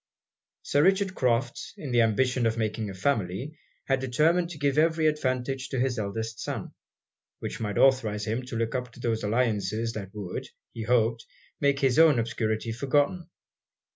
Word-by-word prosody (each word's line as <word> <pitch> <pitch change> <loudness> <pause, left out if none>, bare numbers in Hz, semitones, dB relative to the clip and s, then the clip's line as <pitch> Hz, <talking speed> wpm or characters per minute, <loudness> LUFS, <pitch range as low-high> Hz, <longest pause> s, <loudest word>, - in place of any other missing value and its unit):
Sir 145 - +2
Richard 190 +2 +3
Crofts, 125 -3 -1
in 140 - -6
the 120 -1 +4
ambition 120 +2 +2
of 115 0 -1
making 110 -1 -2
a 95 - -7
family, 110 - -1 0.3
had 135 -1 +1
determined 155 +7 +2
to 170 - -8
give 145 0 +1
every 160 0 +2
advantage 135 -3 0
to 130 - -2
his 125 -2 0
eldest 110 +2 -4
son, - - -5 0.6
which - - -6
might 105 -3 -3
authorise 110 -6 +3
him 115 +3 -2
to 125 - -6
look 115 +1 -1
up 125 -1 -3
to - - -15
those 115 -2 -1
alliances 110 0 0
that 100 -4 -6
would, 100 -4 -5 0.3
he 115 - -5
hoped, 115 -1 +2 0.4
make 140 -1 +2
his 135 +1 +3
own 160 -5 +7
obscurity 115 -1 -1
forgotten. 145 +8 0
125 Hz, 170 wpm, -27 LUFS, 110-140 Hz, 0.6 s, own